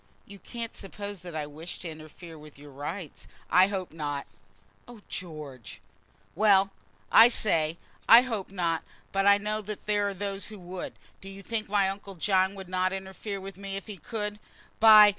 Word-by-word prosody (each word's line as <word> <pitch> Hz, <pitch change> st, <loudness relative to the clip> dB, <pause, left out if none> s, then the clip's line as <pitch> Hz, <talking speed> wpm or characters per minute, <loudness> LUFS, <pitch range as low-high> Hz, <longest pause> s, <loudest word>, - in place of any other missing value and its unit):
"You 200 Hz, 0 st, -12 dB
can't 230 Hz, +1 st, -5 dB
suppose 200 Hz, -1 st, -7 dB
that 175 Hz, -2 st, -8 dB
I 155 Hz, -1 st, -2 dB
wish 155 Hz, +4 st, -7 dB
to 180 Hz, -, -7 dB
interfere 160 Hz, +2 st, -10 dB
with 150 Hz, -2 st, -13 dB
your 145 Hz, 0 st, -12 dB
rights?" 150 Hz, +4 st, -6 dB, 0.2 s
"I 185 Hz, +1 st, +7 dB
hope 190 Hz, -3 st, -3 dB
not." 145 Hz, -3 st, -3 dB, 0.6 s
"Oh, 240 Hz, -3 st, -12 dB
George!" 150 Hz, -, -7 dB, 0.5 s
"Well; 200 Hz, -2 st, +5 dB, 0.4 s
I 225 Hz, -, +10 dB
say, 165 Hz, -9 st, +2 dB, 0.3 s
I 235 Hz, +2 st, +10 dB
hope 225 Hz, -7 st, -3 dB
not. 170 Hz, -4 st, 0 dB, 0.3 s
But 195 Hz, 0 st, +2 dB
I 200 Hz, 0 st, +8 dB
know 210 Hz, +1 st, -2 dB
there 210 Hz, 0 st, -1 dB
are 200 Hz, -, -3 dB
those 200 Hz, +1 st, -3 dB
who 215 Hz, -, -8 dB
would. 180 Hz, 0 st, -6 dB, 0.3 s
Do 195 Hz, -, -9 dB
you 195 Hz, 0 st, -9 dB
think 220 Hz, 0 st, -3 dB
my 200 Hz, -1 st, +3 dB
uncle 195 Hz, 0 st, -5 dB
John 190 Hz, +2 st, +2 dB
would 190 Hz, -2 st, -8 dB
not 185 Hz, 0 st, +1 dB
interfere 195 Hz, +1 st, -5 dB
with 195 Hz, 0 st, -9 dB
me 195 Hz, 0 st, -5 dB
if 195 Hz, -, -5 dB
he 210 Hz, -3 st, -8 dB
could? 210 Hz, +4 st, -4 dB, 0.4 s
By 215 Hz, -1 st, +10 dB
195 Hz, 180 wpm, -28 LUFS, 170-205 Hz, 0.6 s, I